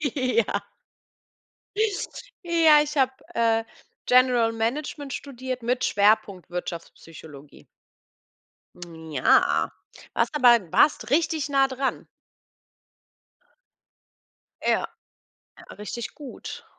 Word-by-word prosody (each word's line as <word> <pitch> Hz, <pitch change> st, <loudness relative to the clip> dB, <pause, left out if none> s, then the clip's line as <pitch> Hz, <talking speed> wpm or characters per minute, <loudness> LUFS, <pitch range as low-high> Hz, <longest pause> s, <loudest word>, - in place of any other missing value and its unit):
Ja. 255 Hz, -5 st, +1 dB, 2.0 s
Ja, 320 Hz, -3 st, +5 dB
ich 300 Hz, -1 st, -4 dB
habe, 265 Hz, -1 st, +4 dB, 0.2 s
äh, 225 Hz, -1 st, +2 dB, 0.4 s
General 250 Hz, -2 st, +4 dB
Management 270 Hz, +5 st, -3 dB
studiert 255 Hz, -2 st, -6 dB
mit 250 Hz, +2 st, -1 dB
Schwerpunkt 200 Hz, -3 st, +1 dB
Wirtschaftspsychologie. 165 Hz, -4 st, -9 dB, 1.2 s
Hm, 160 Hz, -2 st, -10 dB
ja. 125 Hz, -, +3 dB, 0.4 s
Warst -, -, 0 dB
aber 245 Hz, -5 st, +6 dB
warst 290 Hz, -6 st, +3 dB
richtig 310 Hz, 0 st, +1 dB
nah 270 Hz, -1 st, +3 dB
dran. 265 Hz, +1 st, -3 dB, 2.6 s
Ja, -, -, -2 dB, 0.9 s
ja. -, -, -15 dB
Richtig 225 Hz, +3 st, -6 dB
gut. 285 Hz, -5 st, -9 dB
250 Hz, 80 wpm, -25 LUFS, 210-275 Hz, 2.6 s, aber